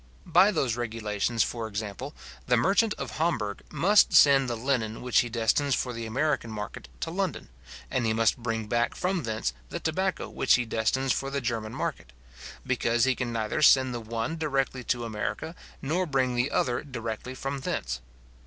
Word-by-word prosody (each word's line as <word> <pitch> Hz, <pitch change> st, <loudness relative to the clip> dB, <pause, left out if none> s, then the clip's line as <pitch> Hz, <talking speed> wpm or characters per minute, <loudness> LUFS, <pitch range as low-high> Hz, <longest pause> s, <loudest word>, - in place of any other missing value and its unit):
By 180 Hz, +4 st, +5 dB
those 135 Hz, -, 0 dB
regulations, 115 Hz, -1 st, -1 dB
for 115 Hz, -2 st, -3 dB
example, 110 Hz, +6 st, -5 dB, 0.3 s
the 125 Hz, -1 st, +4 dB
merchant 205 Hz, -, +3 dB
of -, -, -6 dB
Hamburg 115 Hz, -12 st, 0 dB
must 185 Hz, +7 st, +4 dB
send 135 Hz, -4 st, +6 dB
the 120 Hz, -, -1 dB
linen 115 Hz, -3 st, -1 dB
which 125 Hz, -1 st, +3 dB
he 120 Hz, -, +1 dB
destines 120 Hz, +5 st, +1 dB
for 125 Hz, -, -2 dB
the 115 Hz, -1 st, -5 dB
American 135 Hz, +1 st, 0 dB
market 105 Hz, 0 st, -6 dB
to 165 Hz, -, -2 dB
London, 190 Hz, 0 st, -2 dB, 0.4 s
and 130 Hz, -, 0 dB
he 110 Hz, -, +1 dB
must 115 Hz, 0 st, +3 dB
bring 115 Hz, -2 st, -2 dB
back 120 Hz, +2 st, 0 dB
from 180 Hz, -1 st, -1 dB
thence 110 Hz, -, -2 dB, 0.2 s
the -, -, -4 dB
tobacco 185 Hz, +4 st, -1 dB
which 135 Hz, -, +3 dB
he 120 Hz, -, 0 dB
destines 120 Hz, +4 st, +1 dB
for 135 Hz, -, -2 dB
the 140 Hz, 0 st, -1 dB
German 115 Hz, -3 st, -3 dB
market; -, -, -4 dB, 0.5 s
because 120 Hz, -2 st, +1 dB
he 130 Hz, +1 st, +4 dB
can 125 Hz, -1 st, -3 dB
neither 115 Hz, +5 st, -1 dB
send 130 Hz, -3 st, +6 dB
the 120 Hz, -, -3 dB
one 115 Hz, +8 st, -3 dB
directly 135 Hz, -4 st, -1 dB
to 120 Hz, -1 st, -1 dB
America, 115 Hz, +8 st, -4 dB, 0.3 s
nor 175 Hz, +6 st, 0 dB
bring 130 Hz, -3 st, +1 dB
the 120 Hz, +2 st, +1 dB
other 120 Hz, -2 st, 0 dB
directly 125 Hz, -2 st, -5 dB
from 135 Hz, +1 st, -4 dB
thence. 60 Hz, -, -3 dB
125 Hz, 180 wpm, -27 LUFS, 115-140 Hz, 0.5 s, send